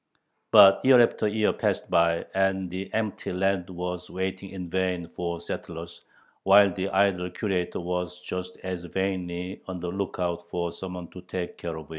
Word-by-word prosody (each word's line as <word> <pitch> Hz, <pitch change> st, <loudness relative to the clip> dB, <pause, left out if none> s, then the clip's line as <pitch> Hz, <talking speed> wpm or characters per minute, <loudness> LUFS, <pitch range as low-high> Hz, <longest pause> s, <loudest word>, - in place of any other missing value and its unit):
But 95 Hz, 0 st, +8 dB
year 130 Hz, -1 st, +7 dB
after 115 Hz, -2 st, +3 dB
year 105 Hz, 0 st, +2 dB
passed -, -, -1 dB
by 85 Hz, 0 st, +3 dB
and 95 Hz, -1 st, +1 dB
the 95 Hz, +1 st, -5 dB
empty 110 Hz, -2 st, -2 dB
land 95 Hz, 0 st, 0 dB
was 90 Hz, 0 st, -5 dB
waiting 95 Hz, +1 st, -3 dB
in 95 Hz, -2 st, -6 dB
vain 90 Hz, -1 st, -1 dB
for 85 Hz, 0 st, -4 dB
settlers, 85 Hz, 0 st, -7 dB, 0.4 s
while 100 Hz, 0 st, +6 dB
the 95 Hz, +2 st, -2 dB
idle 95 Hz, -2 st, +2 dB
Curator 90 Hz, -1 st, -2 dB
was 90 Hz, 0 st, -3 dB
just 90 Hz, 0 st, -5 dB
as 90 Hz, -2 st, -4 dB
vainly 90 Hz, 0 st, -3 dB
on 95 Hz, -1 st, -5 dB
the 90 Hz, 0 st, -4 dB
lookout 90 Hz, -2 st, -3 dB
for 85 Hz, -1 st, -2 dB
someone 90 Hz, -1 st, -7 dB
to 90 Hz, -, -10 dB
take 90 Hz, 0 st, -5 dB
care 85 Hz, -2 st, -4 dB
of. 80 Hz, -2 st, -10 dB
90 Hz, 165 wpm, -27 LUFS, 85-95 Hz, 0.4 s, But